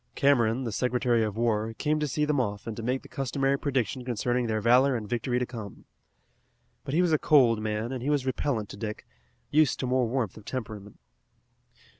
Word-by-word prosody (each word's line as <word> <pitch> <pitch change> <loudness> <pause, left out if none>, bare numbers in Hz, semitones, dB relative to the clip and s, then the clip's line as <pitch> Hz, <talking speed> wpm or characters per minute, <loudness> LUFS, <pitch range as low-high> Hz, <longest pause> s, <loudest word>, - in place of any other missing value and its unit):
Cameron, 130 -3 +3
the 115 - -3
Secretary 125 +1 +1
of 105 -1 -3
War, 115 -1 0
came 155 0 0
to 150 - 0
see 150 +2 0
them 150 -2 +1
off 105 -4 -2
and 115 - -5
to 115 - -6
make 125 +3 -1
the - - -12
customary 135 +1 0
prediction 130 -2 -1
concerning 120 0 -1
their 110 -1 0
valor 125 +4 +4
and 110 -3 -4
victory 120 +2 -1
to 125 - 0
come. 110 -5 -9 1.0
But 135 - -3
he 175 - +4
was 170 -3 +2
a 155 - +3
cold 120 -7 +4
man, 110 +2 -2
and 130 -2 -4
he 135 - -2
was 145 -3 +1
repellent 130 -4 -1
to - - -9
Dick, 105 0 -5 0.5
used 155 -1 +3
to - - -1
more 125 -1 +1
warmth 115 -5 -2
of 105 - -13
temperament. 110 -5 -6
125 Hz, 205 wpm, -27 LUFS, 110-135 Hz, 1.0 s, valor